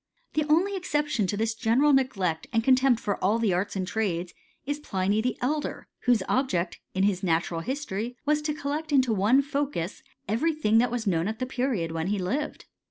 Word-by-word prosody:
The 305 -1 +1
only 370 +6 +3
exception 295 - 0
to 205 - -2
this 225 +1 0
general 245 +6 +3
n^ 195 -12 +1
and 225 -2 +1
contempt 260 -1 +4
for 200 -3 -3
all 205 +4 +3
the 225 -5 +1
arts 190 +4 -1
and 190 -1 -1
trades, 185 -5 -2 0.3
is 290 +2 -2
Plin; 210 0 0
Elder, 295 +4 -2 0.2
whose 235 -6 +4
object, 185 -10 0 0.2
in 190 - +2
his 195 -2 +2
natural 165 -1 0
history. 245 - -4 0.4
Collect 300 +3 -3
into 260 -5 +3
one 220 +8 +4
focus, 275 - -3 0.3
every 295 - +1
thing 225 -7 +3
that 245 - +3
was 240 -1 -3
knoti 190 +3 0
the 255 - -2
period 245 -10 -1
when 165 +1 -2
he 205 +1 0
lived. 255 +12 -3
225 Hz, 175 wpm, -27 LUFS, 190-275 Hz, 0.4 s, contempt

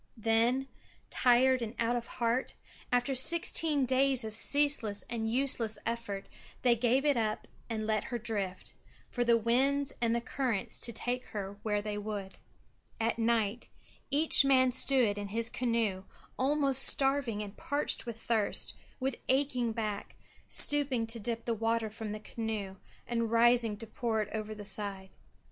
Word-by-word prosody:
Then, 230 +4 +1 0.4
tired 255 +1 +4
and 230 +1 -5
out 235 +1 +1
of 240 -1 -3
heart, 240 +1 -1 0.4
after 245 +2 +1
sixteen 305 0 +3
days 260 0 +2
of 220 -1 -6
ceaseless 265 -4 +3
and 225 -2 -2
useless 240 -4 0
effort, 230 -4 -3 0.4
they 245 -2 +5
gave 250 +4 +1
it 290 -3 +3
up 215 -2 -1 0.2
and 220 -1 -3
let 215 -1 0
her 240 - -3
drift, 205 -4 -4 0.4
for 245 - 0
the 235 -1 +4
winds 270 +5 +1
and 235 0 0
currents 250 -8 -2
to 235 - -1
take 245 +3 -3
her 200 -1 -6
where 210 -1 -1
they 210 -1 -3
would. 205 -2 -6 0.6
At 230 +1 0
night 230 -1 0 0.4
each 290 +1 +3
man 260 -2 +4
stood 250 -5 +3
in 205 - -4
his 225 +3 -1
canoe 230 -6 -1 0.3
almost 275 0 +1
starving 270 -7 +1
and 200 -1 -9
parched 285 -3 -2
with 230 -1 -6
thirst, 225 -3 -1 0.3
with 265 -1 -2
aching 255 -3 +1
back, 215 -3 -4 0.3
stooping 275 -5 +4
to 230 +1 -6
dip 230 +1 -4
the 235 - 0
water 225 0 -1
from 220 -1 -6
the 215 - -5
canoe 215 -3 -5 0.3
and 230 -1 -1
rising 230 -1 +4
to 225 - -7
pour 220 0 -1
it 210 - -11
over 215 0 -4
the 205 -1 -9
side. 195 -1 -3
230 Hz, 155 wpm, -31 LUFS, 215-255 Hz, 0.6 s, they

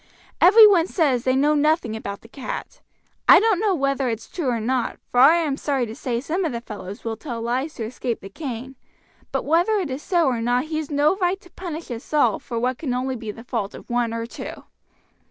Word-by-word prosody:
"Every 430 +5 +9
one 365 -5 +5
says 275 -10 +1
they 255 0 +3
know 290 +3 +3
nothing 300 -6 +1
about 200 -2 -6
the - - -15
cat. 275 - -7 0.5
I - - +10
don't 435 -4 +2
know 410 -2 +2
whether 275 -3 0
it's 225 -1 -4
true 335 -7 -4
or 235 -2 0
not, 245 +2 -1
for 245 - +2
I 285 +6 +8
am 310 -5 0
sorry 275 -5 0
to 220 - -7
say 235 0 -3
some 325 +9 -2
of 325 - -1
the 235 - -3
fellows 205 -4 -9
will 225 -1 -3
tell 235 -1 -6
lies 255 +7 -2
to 230 - -4
escape 240 0 -4
the 195 - -8
cane, 260 +1 -6 0.5
but - - -2
whether 340 +8 +3
it 365 -9 -1
is 260 +3 -4
so 345 -2 +2
or 245 -4 0
not 245 +3 +1
he's 310 -1 -3
no 295 +5 +2
right 370 0 0
to 355 - -19
punish 335 -5 -7
us 235 0 -7
all 295 - +3
for 235 - -6
what 250 +1 -1
can 260 -6 -2
only 260 +1 -2
be 225 -3 -7
the 225 +2 -7
fault 230 -5 -3
of - - -11
one 240 -1 +1
or 230 0 -3
two." 235 - -8
265 Hz, 230 wpm, -23 LUFS, 235-320 Hz, 0.5 s, I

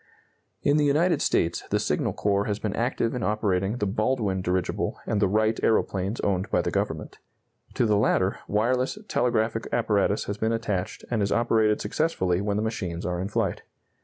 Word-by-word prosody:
In 145 +1 +3
the 150 - +3
United 160 +5 +2
States 85 +1 +1
the - - +2
Signal - - 0
Corps 100 0 +1
has 105 -1 -1
been 105 -2 -3
active 115 -1 0
in 125 - -3
operating 105 -1 0
the 105 - -1
Baldwin 105 -2 0
dirigible 90 -1 -1
and 105 -1 0
the 100 - +4
Wright 110 +3 +1
aeroplanes 100 -1 +1
owned 95 -2 0
by - - +1
the - - -1
Government. - - -3 0.6
To - - +2
the 105 -2 +3
latter, 95 -2 +2
wireless 125 - +1
telegraphic 115 - 0
apparatus 105 -3 +1
has 100 0 -5
been 110 +1 +1
attached 105 -5 -3
and 115 -3 +1
is 100 - 0
operated 110 -2 +2
successfully 100 - 0
when 100 0 -1
the 105 - 0
machines 90 -6 -3
are 90 -1 -2
in 95 - -2
flight. 105 - -1
105 Hz, 180 wpm, -26 LUFS, 95-115 Hz, 0.6 s, the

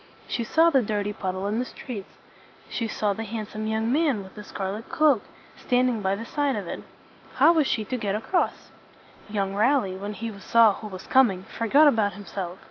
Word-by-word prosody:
She 235 - -2
saw 325 +8 +4
the 270 -4 +4
dirty 210 -2 -2
puddle 185 -1 -3
in 210 +3 -1
the 250 - -1
street. 225 -6 -8 0.6
She 230 - -3
saw 210 -1 0
the 225 - -5
handsome 215 0 -5
young 220 +1 0
man 280 -8 +1
with 190 - -13
the 210 - -9
scar 195 -2 -4
let 215 +3 -7
cloak, 295 -8 +3 0.3
stand 250 0 +2
ing 230 -3 -2
by 190 0 +1
the 225 +3 -6
side 285 0 0
of 205 -3 -4
it. - - -5 0.5
How 335 - +6
was 310 -4 +2
she 215 - -1
to 255 - -3
get 205 -4 -1
across? 345 - -1 0.6
Young 200 -2 -1
Raleigh, 210 -3 +2
when 205 +2 -5
he 225 +3 -5
saw 225 +1 +5
who 215 - -8
was 190 -2 -9
coming, 225 -9 +3
forgot 270 +10 +3
about 220 -7 +3
himself. 190 -2 -6
215 Hz, 205 wpm, -25 LUFS, 200-250 Hz, 0.6 s, How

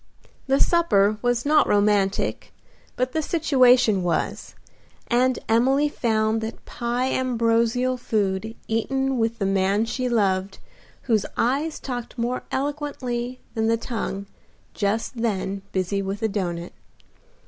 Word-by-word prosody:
The 270 +1 +3
supper 215 - +3
was 245 0 0
not 300 +1 +4
romantic, 205 -1 +1 0.4
but 255 +1 -1
the 315 - 0
situation 255 - +4
was, 175 -3 -2 0.5
and 255 +1 +3
Emily 265 +6 +3
found 220 -4 0
that 220 +1 -6
pie 245 +2 -2
ambrosial 240 0 +1
food 215 -1 -1
eaten 265 +3 0
with 225 0 0
the 200 - -1
man 195 +2 +2
she 250 +2 -2
loved, 195 -4 +1 0.5
whose 220 -4 +1
eyes 285 +6 0
talked 245 -2 -6
more 240 +2 -1
eloquently 265 -4 -3
than 220 -1 0
the 230 0 +3
tongue 220 -4 -4 0.5
just 220 +4 -1
then 200 -3 -1
busy 190 +1 -1
with 195 +2 -4
a - - +3
doughnut. 175 -4 -3
230 Hz, 125 wpm, -24 LUFS, 205-255 Hz, 0.5 s, not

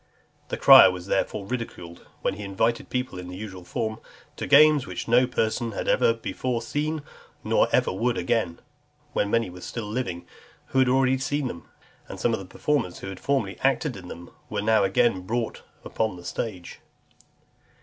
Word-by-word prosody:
The - - -4
crier 95 - +9
was 90 -1 -6
therefore 100 +1 -1
ridiculed, 100 -7 -6 0.2
when - - +1
he 105 +1 -7
invited 115 +4 -1
people 125 -7 -3
in 90 - -8
the 90 0 -8
usual 95 -3 -8
form, 110 +5 -3 0.4
"to - - -5
games 150 -1 +6
which 90 -1 -5
no 125 +2 +4
person 115 -1 -1
had - - -4
ever - - +4
before 115 +1 -3
seen, 150 +4 -2 0.4
nor - - +3
ever - - +2
would 120 +5 0
again;" 90 -3 -1 0.5
when 100 - 0
many 115 -4 +1
were 90 0 -11
still 115 +3 -5
living 105 -6 -4 0.4
who 135 - +1
had 130 -1 +4
already 130 0 +3
seen 135 +1 -1
them; 85 -8 -8 0.4
and - - -8
some 115 - +1
of 110 - -1
the 95 - -8
performers 115 -1 -1
who 95 - -7
had 95 -1 -8
formerly 130 -9 -1
acted 135 0 +1
in 90 -2 -10
them, 85 0 -10 0.2
were 105 -1 -2
now 110 -1 +4
again 95 +1 +2
brought 115 +4 -3 0.2
upon 110 -4 -1
the 90 0 -12
stage. 90 -6 -5
110 Hz, 180 wpm, -25 LUFS, 95-125 Hz, 0.5 s, crier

